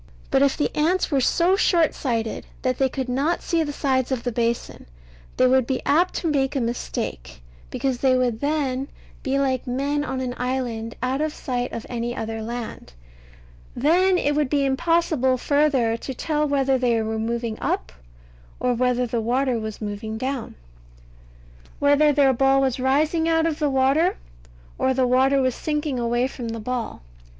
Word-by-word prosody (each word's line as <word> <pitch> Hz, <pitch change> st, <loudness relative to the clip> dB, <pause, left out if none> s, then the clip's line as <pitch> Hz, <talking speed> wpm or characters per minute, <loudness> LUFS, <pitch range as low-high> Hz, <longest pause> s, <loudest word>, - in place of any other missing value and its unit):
But 270 Hz, -, +3 dB
if 280 Hz, -1 st, +3 dB
the 295 Hz, -, -1 dB
ants 335 Hz, +4 st, +1 dB
were 275 Hz, -2 st, +2 dB
so 350 Hz, +8 st, +3 dB
short 340 Hz, -5 st, +3 dB
sighted 230 Hz, -4 st, -3 dB, 0.2 s
that 255 Hz, -1 st, 0 dB
they 265 Hz, -1 st, +3 dB
could 260 Hz, 0 st, -4 dB
not 275 Hz, +7 st, 0 dB
see 335 Hz, -1 st, +1 dB
the 300 Hz, -2 st, -2 dB
sides 265 Hz, -3 st, 0 dB
of 255 Hz, -3 st, -1 dB
the 245 Hz, -, -1 dB
basin, 235 Hz, -, -2 dB, 0.5 s
they 255 Hz, -, +4 dB
would 255 Hz, -1 st, +3 dB
be 265 Hz, -2 st, 0 dB
apt 345 Hz, +5 st, +2 dB
to 340 Hz, -, -2 dB
make 275 Hz, -3 st, 0 dB
a -, -, +1 dB
mistake, 65 Hz, -, -4 dB, 0.3 s
because 255 Hz, -, -2 dB
they 260 Hz, -1 st, +3 dB
would 245 Hz, -3 st, 0 dB
then 280 Hz, -3 st, -1 dB, 0.3 s
be 270 Hz, -1 st, -1 dB
like 265 Hz, -2 st, 0 dB
men 280 Hz, +4 st, -1 dB
on 265 Hz, -2 st, -3 dB
an 255 Hz, -1 st, -3 dB
island 245 Hz, -3 st, -3 dB
out 260 Hz, +3 st, 0 dB
of 310 Hz, 0 st, 0 dB
sight 245 Hz, -1 st, -3 dB
of 230 Hz, -, -6 dB
any 240 Hz, 0 st, -3 dB
other 225 Hz, 0 st, -4 dB
land. 235 Hz, -, -6 dB, 0.8 s
Then 360 Hz, +8 st, +3 dB
it 290 Hz, -4 st, +1 dB
would 295 Hz, -2 st, +1 dB
be 280 Hz, -1 st, +1 dB
impossible 275 Hz, -2 st, +1 dB
further 275 Hz, -4 st, +2 dB
to 265 Hz, -, -6 dB
tell 300 Hz, +2 st, 0 dB
whether 270 Hz, -2 st, +1 dB
they 240 Hz, -2 st, +2 dB
were 220 Hz, 0 st, -2 dB
moving 230 Hz, 0 st, -3 dB
up, 65 Hz, 0 st, -1 dB, 0.7 s
or 250 Hz, 0 st, +1 dB
whether 250 Hz, +1 st, +1 dB
the 235 Hz, -1 st, -2 dB
water 250 Hz, +1 st, 0 dB
was 220 Hz, 0 st, -6 dB
moving 215 Hz, +1 st, -4 dB
down; 260 Hz, 0 st, -4 dB, 1.2 s
whether 285 Hz, +1 st, +4 dB
their 280 Hz, -2 st, +4 dB
ball 270 Hz, +2 st, +3 dB
was 265 Hz, -2 st, 0 dB
rising 305 Hz, +5 st, +2 dB
out 325 Hz, 0 st, +2 dB
of 320 Hz, -2 st, -1 dB
the 300 Hz, -2 st, +1 dB
water, 275 Hz, +7 st, +2 dB, 0.6 s
or 260 Hz, 0 st, +2 dB
the 260 Hz, 0 st, +2 dB
water 260 Hz, +2 st, +3 dB
was 255 Hz, -1 st, +1 dB
sinking 300 Hz, -3 st, -2 dB
away 240 Hz, +1 st, +1 dB
from 255 Hz, -2 st, -5 dB
the 230 Hz, 0 st, -4 dB
ball. 235 Hz, -, -4 dB
260 Hz, 175 wpm, -23 LUFS, 240-290 Hz, 1.2 s, they